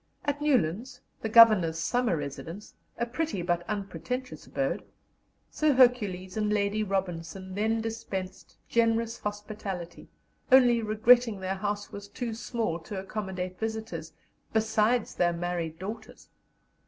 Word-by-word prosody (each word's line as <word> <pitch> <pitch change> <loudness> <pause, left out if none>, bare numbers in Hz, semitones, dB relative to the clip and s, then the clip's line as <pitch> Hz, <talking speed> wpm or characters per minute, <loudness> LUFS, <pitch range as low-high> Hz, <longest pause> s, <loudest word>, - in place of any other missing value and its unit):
At 290 0 -1
Newlands, 250 - +1 0.2
the 220 - -2
Governor's 215 -8 +7
summer 235 +2 +1
residence, 155 +7 -7 0.2
a 235 - 0
pretty 250 - -2
but 175 0 0
unpretentious 210 +6 -4
abode, - - -1 0.7
Sir 305 -1 +2
Hercules 205 -8 +3
and 210 -1 0
Lady 205 0 +1
Robinson 190 -2 -3
then 220 +3 0
dispensed 220 -5 -5
generous 230 0 +1
hospitality, 205 -4 -6 0.4
only 245 -3 +6
regretting 225 0 +4
their 190 0 -2
house 205 +1 -3
was 200 0 -8
too 230 +3 -4
small 225 -6 -2
to 195 +4 -7
accommodate 190 -2 -5
visitors, 220 -8 -4 0.4
besides 220 +1 +2
their 175 -1 +2
married 170 -2 -3
daughters. 210 +6 -8
210 Hz, 120 wpm, -28 LUFS, 185-230 Hz, 0.7 s, Governor's